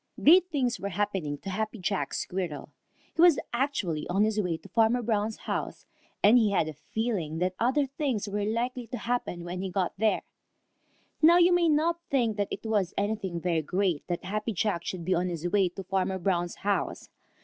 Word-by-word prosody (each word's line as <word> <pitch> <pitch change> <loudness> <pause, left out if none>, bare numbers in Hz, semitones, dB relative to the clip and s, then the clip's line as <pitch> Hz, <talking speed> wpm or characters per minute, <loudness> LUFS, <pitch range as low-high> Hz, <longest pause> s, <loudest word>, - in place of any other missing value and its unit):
_ - - -10
Great 360 +4 +7
things 260 -6 0
were 200 - -3
happening 190 -7 -2
to 195 - -7
Happy 215 +3 -2
Jack 180 -7 -2
Squirrel. 180 -5 -4 0.4
He 330 - +1
was 345 -4 +7 0.2
actually 235 - -1
on 195 +4 +2
his 215 0 +1
way 175 -4 -1
to 160 - -15
Farmer 230 +1 +2
Brown's 215 -1 0
house, - - -4 0.4
and 225 +5 +7
he 220 -3 +3
had 185 -5 +1
a 155 - -5
feeling 180 - -3
that 180 +2 0
other 260 +5 +2
things 270 -6 -2
were 205 0 -2
likely 240 +3 -2
to 245 - -5
happen 235 -9 -2
when 180 +1 -5
he 190 - -3
got 185 -1 -1
there. 220 0 +2 1.0
Now 335 +2 +7
you 355 0 +5
may 345 -2 +3
not 325 +3 +2
think 235 -6 +1
that 205 -1 0
it - - -6
was 205 -4 0
anything 200 -4 -1
very 170 -2 0
great 180 0 -1
that 175 -1 -3
Happy 210 +4 -2
Jack 190 -3 -1
should 175 -3 -4
be 185 - +2
on 180 +1 +1
his 170 0 -3
way 190 0 +2
to 190 +2 -8
Farmer 190 0 -1
Brown's 175 -1 -1
house. 205 0 -2
205 Hz, 200 wpm, -28 LUFS, 180-240 Hz, 1.0 s, Great